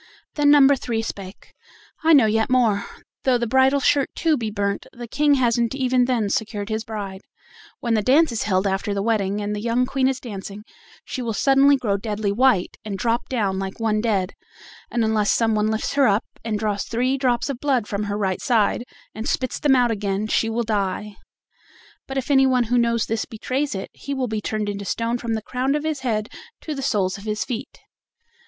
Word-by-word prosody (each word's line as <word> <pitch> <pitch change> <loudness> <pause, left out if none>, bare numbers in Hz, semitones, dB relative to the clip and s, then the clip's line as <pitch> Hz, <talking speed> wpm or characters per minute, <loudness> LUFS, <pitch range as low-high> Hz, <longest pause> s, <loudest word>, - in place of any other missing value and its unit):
Then 295 -1 +3
number 285 -1 +7
three 235 -3 -3
spake: 195 -3 -8 0.5
"I 325 +1 +5
know 270 -6 +7
yet 220 +2 +1
more: 230 -6 +2 0.4
though 255 -2 +3
the 240 - -1
bridal 265 +4 +3
shirt 275 0 +2
too 325 -2 +2
be 225 -5 -3
burnt, 200 -1 -2
the 240 0 -8
King 290 +4 +3
hasn't 235 -1 +1
even 255 -2 +2
then 230 -5 0
secured 210 -1 -2
his 220 0 -2
bride: 200 -4 -6 0.6
when 235 -1 0
the 220 - +2
dance 280 +7 +4
is 230 - -2
held 190 -2 +1
after 195 +1 -1
the 200 - -1
wedding, 210 -2 0
and 205 0 -2
the 205 - -4
young 235 +2 +1
Queen 260 0 +1
is 265 0 -1
dancing, 205 -3 -8 0.4
she 260 - -5
will 230 -3 -2
suddenly 275 +4 +5
grow 205 -6 0
deadly 210 -1 -2
white, 230 -4 +2
and 205 -2 -4
drop 230 +3 -1
down 200 -7 0
like 195 +2 -5
one 215 -1 +1
dead, 200 -5 0 0.6
and 235 -1 0
unless 215 -1 +1
some 225 -1 +2
one 210 0 +1
lifts 220 0 -1
her 280 -2 +4
up 205 +2 +2 0.2
and 220 -2 -1
draws 205 -2 -1
three 250 +3 0
drops 250 -3 0
of 275 -4 -4
blood 265 -6 +1
from 205 0 -3
her 205 0 -2
right 190 -3 -1
side, 230 -1 +2 0.3
and 220 +2 -4
spits 255 - -1
them 285 -3 +4
out 245 -2 +3
again, 200 -1 -1
she 225 +1 +1
will 235 +1 -1
die. 210 -1 -2 0.9
But 270 - -4
if 270 +2 -2
anyone 265 -2 +4
who 240 +2 +1
knows 235 -1 +1
this 225 0 -2
betrays 255 +4 -3
it, 190 - -6
he 280 0 -5
will 265 -1 -1
be 215 -1 -3
turned 215 0 -2
into 200 0 -4
stone 230 +4 -2
from 230 -2 -2
the 220 - -4
crown 260 +4 -1
of 300 - -2
his 310 -2 -2
head 220 -5 -1 0.3
to 310 - -4
the 275 - -5
soles 205 -7 0
of 200 - -12
his 215 0 -2
feet." 240 -4 -6
225 Hz, 210 wpm, -22 LUFS, 210-260 Hz, 0.9 s, number